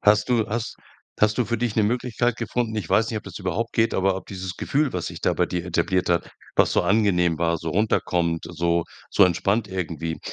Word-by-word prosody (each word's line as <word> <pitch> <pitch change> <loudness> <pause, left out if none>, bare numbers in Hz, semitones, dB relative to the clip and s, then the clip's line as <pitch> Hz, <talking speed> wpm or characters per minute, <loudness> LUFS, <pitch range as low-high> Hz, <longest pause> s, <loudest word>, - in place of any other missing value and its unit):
Hast 105 +2 +4
du 120 -3 +2
has 115 +1 -3 0.5
hast 105 +2 +3
du 125 - +3
für 120 0 -2
dich 120 -3 -1
'ne 110 - +3
Möglichkeit 120 +1 0
gefunden? 120 -3 -2
Ich 100 -7 -3
weiß 110 +1 +3
nicht, 110 - -3
ob - - -13
das 95 -2 -8
überhaupt 100 +5 -2
geht, 115 0 +2
aber 95 0 +2
ob 95 - -7
dieses 95 -2 -6
Gefühl, 145 -1 0
was 90 - -3
sich - - -7
da - - +2
bei - - +2
dir 90 -1 -3
etabliert 90 +1 0
hat, 85 -1 +1 0.2
was - - +3
so - - +3
angenehm 90 -6 +2
war, 85 0 +1
so 80 -1 -4
runterkommt, 85 -4 0
so 85 0 0 0.3
so 100 - +6
entspannt 100 +5 +1
irgendwie, 85 -4 -4
100 Hz, 220 wpm, -24 LUFS, 85-110 Hz, 0.5 s, so